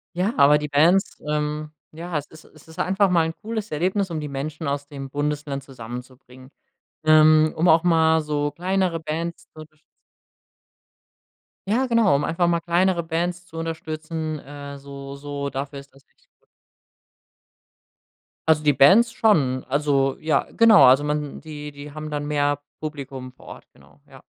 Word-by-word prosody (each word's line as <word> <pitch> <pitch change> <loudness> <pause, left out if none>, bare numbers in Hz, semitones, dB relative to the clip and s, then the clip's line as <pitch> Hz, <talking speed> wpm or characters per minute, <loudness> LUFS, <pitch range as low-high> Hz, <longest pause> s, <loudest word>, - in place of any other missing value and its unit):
Ja, 190 +7 0
aber 150 +1 +6
die 150 0 -4
Bands 165 +7 +2
ähm, 150 0 -2 0.2
ja, 165 +1 -5
es 145 - -5
ist 160 0 -16
es 155 - -20
ist 160 +2 -13
einfach 195 +1 +2
mal 170 -3 +3
'n 160 - -3
cooles 220 -1 -5
Erlebnis, 185 +5 0
um 160 - -3
die 150 - -5
Menschen 150 +3 -5
aus 140 0 -3
dem 135 -2 -8
Bundesland 145 -1 -3
zusammenzubringen, 125 0 -11 0.5
ähm, 155 0 +5
um 165 +3 +1
auch 165 0 +5
mal 160 -2 +3
so 145 -1 -2
kleinere 185 -1 -1
Bands 165 +2 -4
zu - - -15
unterstützen 155 0 -17 1.8
Ja, 250 +5 +2
genau, 230 - +3
um 145 - 0
einfach 170 +3 0
mal 170 -1 +1
kleinere 175 0 +1
Bands 175 +2 -3
zu 165 - -12
unterstützen, 160 -1 -4
äh, 140 0 -9
so 140 0 -9
so, 140 0 -5
dafür 140 +1 -5
ist 140 0 -16
das 135 - -22
echt - - -35
gut. - - - 2.1
Also 155 -1 +4
die 150 - +4
Bands 200 - +5
schon, 145 - +2
also 140 -1 +1
ja, 155 0 +1
genau, 225 -8 +7
also 130 +3 +6
man 150 -1 -3
die 150 -2 -8
die 145 +1 -10
haben 155 0 -6
dann 145 -1 -3
mehr 145 -1 0 0.2
Publikum 135 -4 -7
vor - - -19
Ort, - - -11
genau, - - -22
ja. - - -15
155 Hz, 165 wpm, -23 LUFS, 140-165 Hz, 2.1 s, genau